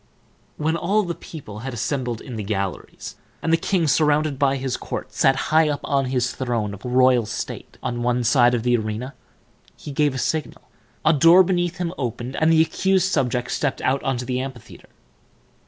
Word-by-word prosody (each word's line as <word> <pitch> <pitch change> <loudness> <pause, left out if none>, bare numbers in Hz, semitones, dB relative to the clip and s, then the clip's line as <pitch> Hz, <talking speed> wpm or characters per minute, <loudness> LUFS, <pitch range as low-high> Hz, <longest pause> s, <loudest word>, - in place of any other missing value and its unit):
When 160 +2 0
all 195 +6 +1
the 175 -2 -3
people 130 -12 -10
had 130 +2 -5
assembled 120 0 -2
in 125 - -8
the 110 - -3
galleries, 100 -3 -4 0.2
and 165 - 0
the - - +8
king, 175 0 0
surrounded 150 -1 +2
by 140 -1 +3
his 130 -1 -2
court, - - -6
sat 135 - +3 0.2
high 160 -1 +5
up 145 - -2
on 140 -1 +1
his 125 -1 0
throne 115 -5 -2
of 100 - -11
royal 125 -2 +3
state 120 - -6
on 120 0 -3
one 120 0 +1
side 120 0 +4
of 115 - -2
the 120 0 +3
arena, 110 +3 -3 0.6
he 145 - -8
gave 145 -1 +1
a - - -3
signal, 155 +1 -2 0.4
a 155 - +5
door 165 +5 +7
beneath 175 -1 -1
him 175 -1 -3
opened, 120 +1 -4
and 160 +1 +3
the 160 0 +6
accused 190 +3 +1
subject 125 -3 0
stepped 140 -3 -1
out 135 +1 +1
into 125 -2 -2
the 125 0 -2
amphitheater. 130 -3 -8
135 Hz, 190 wpm, -22 LUFS, 120-155 Hz, 0.6 s, the